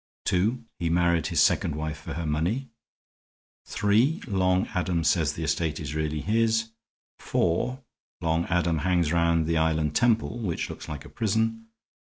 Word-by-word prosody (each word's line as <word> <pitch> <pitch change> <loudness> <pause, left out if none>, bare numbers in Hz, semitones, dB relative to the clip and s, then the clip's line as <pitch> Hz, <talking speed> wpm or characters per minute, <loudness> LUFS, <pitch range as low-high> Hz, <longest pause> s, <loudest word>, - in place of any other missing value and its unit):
(2) 110 +7 +1
He 85 -1 0
married 85 -1 +2
his - - +3
second 75 - +2
wife 80 0 -4
for - - -7
her 85 0 -3
money. 90 - -1 1.0
(3) 110 +10 +2
Long 95 -3 +1
Adam 90 -2 0
says 80 -1 +2
the 80 - -5
estate 80 0 -1
is 75 -1 -5
really 75 -1 -2
his. 110 +2 +1 0.5
(4) 125 +11 0 0.4
Long 80 0 0
Adam 85 -2 +1
hangs 85 -1 +1
round 85 -1 +2
the 80 0 +1
island 80 -1 +1
temple, 120 -1 +2
which 95 -8 -3
looks - - -9
like 75 -1 -6
a - - -11
prison. 115 +5 -1
85 Hz, 155 wpm, -26 LUFS, 80-110 Hz, 1.0 s, his